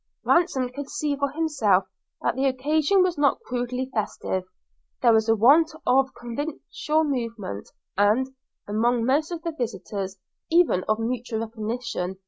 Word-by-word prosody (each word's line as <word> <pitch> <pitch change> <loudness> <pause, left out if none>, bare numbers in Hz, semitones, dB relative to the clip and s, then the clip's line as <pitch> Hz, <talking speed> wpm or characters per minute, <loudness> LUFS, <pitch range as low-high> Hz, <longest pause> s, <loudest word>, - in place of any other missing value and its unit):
Ransom 275 -8 +2
could 280 +2 -7
see 295 -2 -1
for 280 0 0
himself 275 - +2 0.4
that - - +2
the 270 +1 +1
occasion 305 +8 +2
was 360 -4 -1
not 285 -2 +3
crudely 250 +1 -3
festive; 195 -3 -2 0.6
there 235 -2 +6
was 220 0 +3
a 225 - +5
want 285 +9 +6 0.2
of 265 +1 +3
convivial 300 +5 -2
movement, 230 - -4 0.3
and, 210 +6 +3 0.4
among 230 +3 +1
most 290 +5 +2
of 335 -1 -5
the 335 - -2
visitors, 195 - -4 0.3
even 330 - +3
of 215 - +1
mutual 230 0 -2
recognition. 220 -4 -4
250 Hz, 140 wpm, -25 LUFS, 220-290 Hz, 0.6 s, there